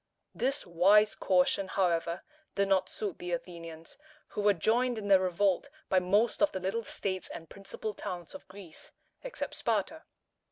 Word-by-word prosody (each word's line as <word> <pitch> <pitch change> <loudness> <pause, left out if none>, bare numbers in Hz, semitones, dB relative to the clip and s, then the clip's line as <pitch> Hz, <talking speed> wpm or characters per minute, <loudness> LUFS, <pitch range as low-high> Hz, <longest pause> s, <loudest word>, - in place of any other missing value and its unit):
This 270 +3 -1
wise 195 +5 +5
caution, 185 +1 +2
however, 170 -2 0 0.3
did 200 0 +2
not 190 -1 +2
suit 205 -5 -4
the 175 0 -4
Athenians, 165 - -7 0.3
who - - -3
were 205 -1 +4
joined 235 +7 +2
in 205 -2 -4
their 195 -1 +7
revolt 185 +6 +1 0.2
by 190 - +4
most 205 +6 +2
of 305 - +4
the 190 - -3
little 195 +5 -2
states 190 -3 -3
and 165 -2 -9
principal 200 +2 -6
towns 175 -3 -6
of 285 - -11
Greece, 185 -4 -11 0.3
except - - -5
Sparta. - - -1
190 Hz, 160 wpm, -31 LUFS, 180-210 Hz, 0.3 s, their